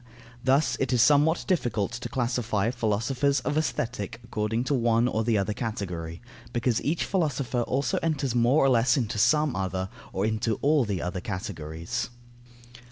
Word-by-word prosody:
Thus 135 -1 +2
it 135 -2 0
is 125 - +2
somewhat 150 +6 +4
difficult 120 - 0
to 120 0 -5
classify 120 -3 0
philosophers 125 +4 0
of 145 +3 -2
Aesthetic 120 -8 -2
according 110 0 -1
to 135 - -1
one 115 -2 +3
or 110 -2 0
the 115 -1 +2
other 100 +1 0
category, 90 -6 -5 0.3
because 120 -1 0
each 160 +4 0
philosopher 145 -9 0
also 130 +2 0
enters 145 -6 0
more 125 +4 +4
or - - +5
less 120 +1 +3
into 110 -4 -1
some 150 +5 +3
other, 95 0 -2 0.2
or 95 +2 -1
into 110 0 0
all 145 -2 +4
the 100 -4 -2
other 90 +1 -3
categories. 85 -3 -4
120 Hz, 160 wpm, -27 LUFS, 105-135 Hz, 0.3 s, or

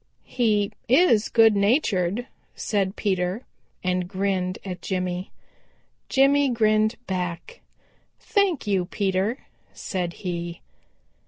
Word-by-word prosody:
"He 210 -5 +1 0.2
is 250 -6 +4
good 225 -2 +5
natured," 200 - +1 0.3
said 200 -2 -1
Peter, 190 +2 -1 0.4
and 180 -1 0
grinned 185 -1 -1
at 180 -2 -6
Jimmy. 185 -1 -3 0.8
Jimmy 275 +1 +4
grinned 215 -1 +2
back. 180 - -4 0.6
"Thank 395 - +1
you, 195 -3 +1
Peter," 195 +6 -1 0.3
said 180 -3 -3
he. 170 -1 -4
200 Hz, 95 wpm, -24 LUFS, 180-230 Hz, 0.8 s, good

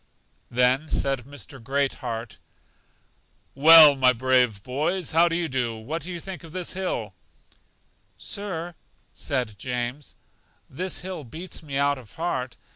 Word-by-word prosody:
Then 125 +5 +2
said 135 -3 -1
Mr. 135 -2 -11
Great 140 +2 0
heart: 115 -2 -5 1.1
Well, 155 +1 +9
my 130 -1 +4
brave 125 -4 +2
boys, 155 +7 -1
how 170 +2 +5
do 165 - -1
you 170 -1 0
do? 125 -5 -2
What 145 +10 -5
think 180 -1 -6
you - - -11
of - - -14
this 185 -2 -3
hill? 180 - -3 1.0
Sir, 175 -4 -4 0.4
said 125 -8 -2
James, 125 +3 -4 0.5
this 185 +8 -4
hill 180 -3 -6
beats 160 +9 -7
me 140 -4 -5
out 140 -1 +2
of 120 -5 -15
heart! 130 -7 -3
140 Hz, 135 wpm, -25 LUFS, 125-165 Hz, 1.1 s, Well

